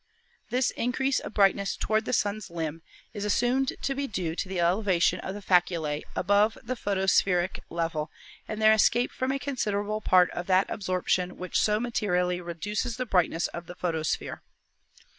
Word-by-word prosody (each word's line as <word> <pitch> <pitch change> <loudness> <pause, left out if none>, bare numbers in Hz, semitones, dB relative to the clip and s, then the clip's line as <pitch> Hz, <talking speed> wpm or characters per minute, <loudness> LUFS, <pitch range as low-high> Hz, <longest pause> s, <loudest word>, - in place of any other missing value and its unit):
This 250 +1 +1
increase 260 +3 0
of - - -8
brightness 195 -1 +3
toward 215 +1 0
the - - -2
Sun's 210 -3 -1
limb 165 -1 -4 0.3
is 205 - -4
assumed 245 +6 +1
to 275 - 0
be 280 0 -2
due 180 -7 -3
to 185 - -3
the 190 -2 -2
elevation 180 0 +2
of 190 - -5
the 205 - -8
faculse 170 -5 +1
above 205 +2 +2
the 255 - -2
photospheric 190 -3 +1
level 165 -2 -2 0.4
and 215 - -5
their 215 0 +6
escape 240 +3 +3
from 260 +1 -2
a 275 - 0
considerable 215 -6 -2
part 180 -3 +4
of 175 - -5
that 190 0 +3
absorption 185 -1 -1
which 185 0 -1
so 210 0 +2
materially 180 -6 0
reduces 210 +7 -3
the 255 - -2
brightness 175 -5 +1
of 170 0 -8
the 180 - -8
photosphere. 160 -3 -2
195 Hz, 165 wpm, -27 LUFS, 175-220 Hz, 0.4 s, their